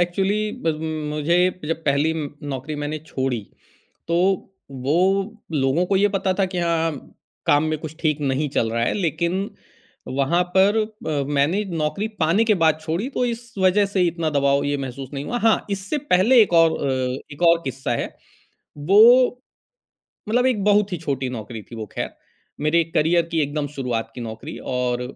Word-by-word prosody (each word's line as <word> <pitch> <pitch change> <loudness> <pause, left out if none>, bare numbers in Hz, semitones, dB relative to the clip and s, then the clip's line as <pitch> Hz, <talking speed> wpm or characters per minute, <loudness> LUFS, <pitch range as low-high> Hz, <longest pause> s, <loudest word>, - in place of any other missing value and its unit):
Actually 195 +4 0
ब - - -6 0.2
म 155 -1 -3
मुझे 155 +4 +2 0.3
जब 165 0 -2
पहली 145 +3 +2
म 155 -3 -3 0.2
नौकरी 135 +3 -4
मैंने 150 +1 -3
छोड़ी, 130 -5 -2 0.7
तो 170 - 0 0.6
वो 135 +2 -2 0.6
लोगों 140 +6 +2
को 195 - 0
ये 205 - +4
पता 195 -1 0
था 195 - +4
कि, 185 -1 -5
हाँ, 165 -1 +1
हाँ 145 - -11 0.3
काम 145 +1 +4
में 155 0 -1
कुछ 155 -1 -8
ठीक 155 -3 0
नहीं 140 +1 0
चल 115 -4 0
रहा 115 0 0
है - - +1
लेक़िन 175 +2 -1 0.6
वहाँ 140 +7 +1
पर 200 +3 +5
अ, 210 - -2
मैंने 150 +9 +2
नौकरी 160 +7 -1
पाने 170 +7 +3
के 220 - +4
बाद 160 -1 +3
छोड़ी 170 +10 -2
तो 250 - +1
इस 235 -1 -5
वजह 190 +2 +4
से 195 -1 -1
इतना 165 -2 -1
दबाव 140 -1 +2
ये 145 0 0
महसूस 135 -1 -6
नहीं 140 0 -4
हुआ। 245 - -2
हाँ, 225 -1 +2
इससे 200 +8 -2
पहले 225 +7 +6
एक 200 - +2
और 165 -1 +6
अ, 130 -1 -1
एक 145 - -11
और 170 0 +4
किस्सा 135 -2 -4
है, - - -2 0.7
वो 240 - +5 0.9
मतलब 245 +3 +2
एक 240 -6 +1
बहुत 205 -1 +3
ही 180 - -2
छोटी 135 -5 -3
नौकरी 110 -2 -6
थी 115 - -12
वो 110 -1 -5
ख़ैर - - -3 0.5
मेरे 165 +3 +3
करियर 165 +2 +3
की 165 - +1
एकदम 145 0 -2
शुरुआत 115 -4 -3
की 125 - -6
नौकरी 115 +6 -7 0.2
और 125 -1 0
160 Hz, 180 wpm, -22 LUFS, 140-195 Hz, 0.9 s, पहले